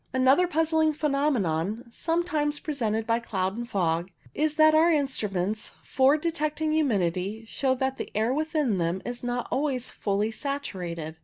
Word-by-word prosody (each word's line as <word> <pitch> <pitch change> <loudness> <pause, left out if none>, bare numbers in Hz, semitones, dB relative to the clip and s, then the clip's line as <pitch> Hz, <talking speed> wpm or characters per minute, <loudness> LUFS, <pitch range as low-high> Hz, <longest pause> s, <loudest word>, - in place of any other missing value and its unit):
Another 265 +7 +4
puzzling 320 -1 +2
phenomenon, 240 - 0
sometimes 315 -2 -1
pre 305 - -4
sented 225 -5 -1
by 230 +1 +1
cloud 190 -4 -2
and 235 +1 -5
fog, 170 -3 0 0.2
is 305 0 0
that 310 0 +6
our 320 +2 +5
instruments 215 - 0
for 270 +3 +3
detecting 310 -1 -1
humidity 210 - 0
show 260 +3 0
that 265 +1 -1
the - - -5
air 225 +4 +2
within 300 - 0
them 170 +2 -1
is 245 0 -5
not 245 0 -2
always 265 -3 -1
fully 205 +2 -1
saturated. 180 - -5
255 Hz, 150 wpm, -27 LUFS, 205-300 Hz, 0.2 s, that